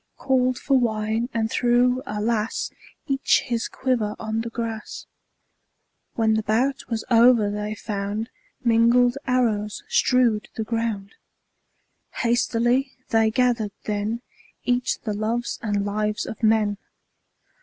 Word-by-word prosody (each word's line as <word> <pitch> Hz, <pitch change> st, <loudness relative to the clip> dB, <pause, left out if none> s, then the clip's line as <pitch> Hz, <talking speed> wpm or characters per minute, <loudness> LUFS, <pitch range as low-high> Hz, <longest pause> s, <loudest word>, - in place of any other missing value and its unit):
Called 255 Hz, -2 st, +1 dB
for 270 Hz, -2 st, +2 dB
wine, 220 Hz, 0 st, -1 dB
and 225 Hz, -1 st, -1 dB
threw 245 Hz, +1 st, +2 dB
— -, -, -31 dB
alas! 215 Hz, +2 st, -1 dB, 0.2 s
— -, -, -32 dB
Each 270 Hz, -, +3 dB
his 235 Hz, -1 st, -1 dB
quiver 240 Hz, -5 st, -1 dB
on 220 Hz, 0 st, -2 dB
the 230 Hz, -, -5 dB
grass. 230 Hz, -2 st, -5 dB, 1.1 s
When 220 Hz, -1 st, +2 dB
the 220 Hz, -, +1 dB
bout 240 Hz, +6 st, 0 dB
was 225 Hz, -2 st, -2 dB
o'er 230 Hz, -3 st, +5 dB
they 210 Hz, +1 st, -3 dB
found 205 Hz, +2 st, -4 dB, 0.3 s
Mingled 240 Hz, +1 st, +4 dB
arrows 220 Hz, -5 st, 0 dB
strewed 240 Hz, -4 st, +2 dB
the 220 Hz, -, -2 dB
ground. 220 Hz, -3 st, -3 dB, 1.1 s
Hastily 240 Hz, +2 st, +1 dB, 0.2 s
they 225 Hz, -1 st, +3 dB
gathered 230 Hz, -3 st, +1 dB
then 215 Hz, +3 st, -2 dB, 0.4 s
Each 245 Hz, 0 st, 0 dB
the 215 Hz, -, -3 dB
loves 225 Hz, +3 st, -2 dB
and 205 Hz, -3 st, -1 dB
lives 210 Hz, +1 st, -1 dB
of 225 Hz, -, -7 dB
men. 215 Hz, -2 st, +2 dB
225 Hz, 125 wpm, -24 LUFS, 215-245 Hz, 1.1 s, o'er